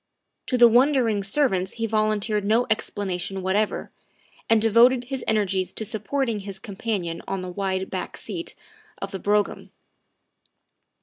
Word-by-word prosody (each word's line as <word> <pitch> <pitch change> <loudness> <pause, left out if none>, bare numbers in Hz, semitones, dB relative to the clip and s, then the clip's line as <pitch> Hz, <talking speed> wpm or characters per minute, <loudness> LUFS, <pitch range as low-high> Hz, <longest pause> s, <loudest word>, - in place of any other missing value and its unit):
To 255 - +1
the 240 -1 +8
wondering 240 -3 +3
servants 195 -4 +1
he 225 - -2
volunteered 215 -1 0
no 225 +4 +2
explanation 195 -3 -2
whatever, 205 +3 0 0.6
and 225 -1 +5
devoted 235 +3 +5
his 265 +1 -5
energies 195 -4 +1
to 220 - -4
supporting 220 +2 -1
his 195 -1 -7
companion 195 -4 -4
on 195 -1 -2
the 185 0 -6
wide 190 0 -2
back - - -4
seat - - -6 0.4
of - - -5
the 195 - -5
brougham. 205 +1 0
210 Hz, 135 wpm, -24 LUFS, 195-230 Hz, 0.6 s, the